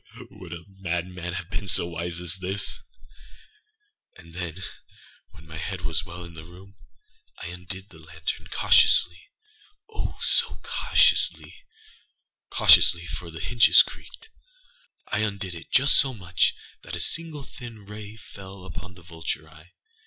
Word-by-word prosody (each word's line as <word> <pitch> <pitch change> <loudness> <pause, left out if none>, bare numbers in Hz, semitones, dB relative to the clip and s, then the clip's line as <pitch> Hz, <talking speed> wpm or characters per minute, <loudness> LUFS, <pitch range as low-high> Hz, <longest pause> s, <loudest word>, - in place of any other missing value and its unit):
Ha!âwould 90 - -12
a 85 0 -7
madman 90 -2 -4
have 90 +1 -6
been 100 - -4
so 95 -2 +5
wise 85 0 -4
as 90 +1 -4
this? 95 +2 -3 1.4
And 85 -2 -15
then, 90 +1 -6 0.7
when 80 - -16
my 80 0 -9
head 95 +2 -4
was 85 -1 0
well 85 0 -9
in 85 -1 -11
the 80 -1 -10
room, 95 +4 -15 0.6
I 85 - -7
undid 90 +3 -7
the 80 - -16
lantern 80 +1 -5
cautiouslyâoh, 425 - +1
so - - +3
cautiouslyâcautiously 445 -2 +2
(for - - -6
the - - -8
hinges - - +7
creaked)âI - - -9
undid 100 -3 -3
it 85 - -10
just 140 +2 +5
so 135 -2 +4
much 90 -5 +1 0.3
that - - -6
a - - -5
single 160 -4 -1
thin 115 -5 -11
ray 105 +1 -9
fell 95 -3 -12
upon 95 -1 -9
the 85 - -15
vulture 80 -2 -5
eye. 80 +3 -18
90 Hz, 135 wpm, -25 LUFS, 85-105 Hz, 1.4 s, hinges